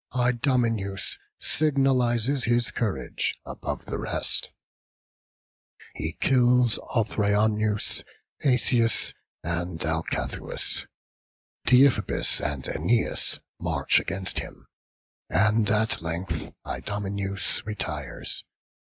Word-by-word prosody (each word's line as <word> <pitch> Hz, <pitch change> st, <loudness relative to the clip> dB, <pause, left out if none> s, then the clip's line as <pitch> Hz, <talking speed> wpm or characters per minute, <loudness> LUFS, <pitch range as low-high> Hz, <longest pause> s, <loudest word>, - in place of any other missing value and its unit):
Idomeneus 120 Hz, -5 st, 0 dB, 0.2 s
signalizes 135 Hz, -3 st, +2 dB
his 120 Hz, 0 st, +1 dB
courage 110 Hz, -5 st, -2 dB
above -, -, -5 dB
the -, -, -4 dB
rest; -, -, +2 dB, 1.4 s
he 80 Hz, +1 st, -4 dB
kills 125 Hz, -2 st, +3 dB, 0.2 s
Othryoneus, 105 Hz, -1 st, +1 dB, 0.4 s
Asius, 120 Hz, -4 st, +2 dB, 0.3 s
and 85 Hz, 0 st, -3 dB
Alcathous; 80 Hz, 0 st, -1 dB, 0.8 s
Deiphobus 125 Hz, -5 st, +4 dB
and 70 Hz, -2 st, -3 dB
Æneas 115 Hz, -, 0 dB, 0.2 s
march -, -, +2 dB
against 95 Hz, +1 st, -1 dB
him, -, -, -9 dB, 0.6 s
and 105 Hz, +4 st, +3 dB
at 110 Hz, -2 st, +2 dB
length 85 Hz, 0 st, -4 dB
Idomeneus 100 Hz, -1 st, -1 dB
retires. 105 Hz, -2 st, -3 dB
110 Hz, 75 wpm, -26 LUFS, 95-120 Hz, 1.4 s, Deiphobus